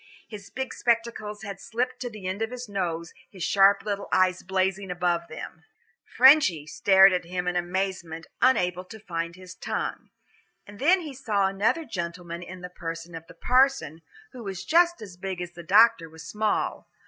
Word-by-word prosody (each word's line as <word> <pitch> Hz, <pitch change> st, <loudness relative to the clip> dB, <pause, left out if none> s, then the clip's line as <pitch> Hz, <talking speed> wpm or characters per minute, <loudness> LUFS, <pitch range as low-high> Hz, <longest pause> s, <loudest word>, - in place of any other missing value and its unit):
His 205 Hz, -3 st, -10 dB
big 265 Hz, 0 st, -5 dB
spectacles 230 Hz, -3 st, -1 dB
had 200 Hz, -2 st, -7 dB
slipped 250 Hz, +2 st, -3 dB
to 245 Hz, -, -4 dB
the 215 Hz, -4 st, -10 dB
end 190 Hz, +3 st, -3 dB
of 225 Hz, -, 0 dB
his 250 Hz, 0 st, -7 dB
nose, 170 Hz, -5 st, -3 dB, 0.2 s
his 185 Hz, -4 st, -8 dB
sharp 195 Hz, +2 st, +4 dB
little 200 Hz, -1 st, -3 dB
eyes 185 Hz, 0 st, +3 dB
blazing 190 Hz, +1 st, -1 dB
above 175 Hz, -1 st, -1 dB
them. 160 Hz, 0 st, -9 dB, 0.5 s
"Frenchy" 255 Hz, -, +6 dB
stared 190 Hz, +4 st, +5 dB
at 180 Hz, -1 st, -1 dB
him 180 Hz, +1 st, -4 dB
in 180 Hz, -, 0 dB
amazement, 175 Hz, -2 st, -3 dB, 0.2 s
unable 180 Hz, -8 st, +2 dB
to 220 Hz, +4 st, -11 dB
find 170 Hz, -4 st, -4 dB
his 185 Hz, -1 st, -11 dB
tongue. -, -, -4 dB, 0.6 s
And 205 Hz, 0 st, -13 dB
then 355 Hz, +7 st, +4 dB
he 305 Hz, -4 st, -7 dB
saw 215 Hz, -7 st, 0 dB
another 205 Hz, +12 st, 0 dB
gentleman 170 Hz, -, -5 dB
in 180 Hz, +1 st, -9 dB
the 180 Hz, -, -7 dB
person 165 Hz, -1 st, -7 dB
of 165 Hz, 0 st, -9 dB
the -, -, -14 dB
parson, 255 Hz, -, +2 dB, 0.3 s
who 250 Hz, -3 st, -10 dB
was 195 Hz, -3 st, -6 dB
just 345 Hz, -4 st, +3 dB
as 185 Hz, -4 st, -11 dB
big 190 Hz, -1 st, -5 dB
as 175 Hz, -1 st, -5 dB
the 175 Hz, 0 st, -10 dB
doctor 195 Hz, -1 st, +4 dB
was 160 Hz, 0 st, -12 dB
small. 215 Hz, 0 st, -1 dB
190 Hz, 180 wpm, -26 LUFS, 175-225 Hz, 0.6 s, Frenchy